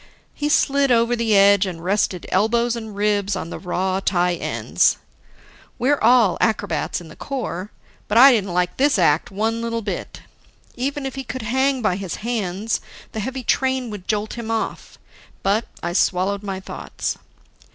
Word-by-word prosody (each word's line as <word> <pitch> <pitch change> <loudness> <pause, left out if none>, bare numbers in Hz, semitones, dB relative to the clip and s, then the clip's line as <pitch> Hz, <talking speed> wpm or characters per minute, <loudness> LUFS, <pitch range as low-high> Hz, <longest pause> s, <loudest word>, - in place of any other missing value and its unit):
He 295 - -2
slid 280 -2 +3
over 235 0 +3
the 225 -3 +2
edge 200 0 +5
and 170 -3 -6
rested 190 -1 0
elbows 235 +4 +2
and 220 -3 -7
ribs 205 -1 +1
on 165 - -5
the - - -6
raw 185 +1 -1
tie 180 -2 +1
ends. - - +1 0.8
We're 275 +4 +2
all 230 -4 +4
acrobats 205 -8 0
in 170 - -11
the 155 - -13
Corps. 220 -8 -4 0.4
But 210 - +1
I 270 +3 +10
didn't 200 -6 +1
like 180 0 0
this 280 -1 +3
act 165 -3 +3
one 220 +3 -1
little 230 -1 -2
bit. 200 - -5 0.5
Even 275 +3 -3
if 270 - -4
he 270 - -5
could 255 -1 -6
hang 265 +3 +1
by 185 -4 +1
his 195 -3 -4
hands, 215 -2 -1 0.3
the 220 - -5
heavy 260 +4 -4
train 260 -2 0
would 205 -3 -8
jolt 210 0 -1
him 230 -1 -5
off. 225 -1 -3 0.5
But 205 +4 +1 0.2
I 170 0 -2
swallowed 190 +2 +1
my 195 -2 -4
thoughts. 190 - -5
215 Hz, 170 wpm, -21 LUFS, 190-240 Hz, 0.8 s, I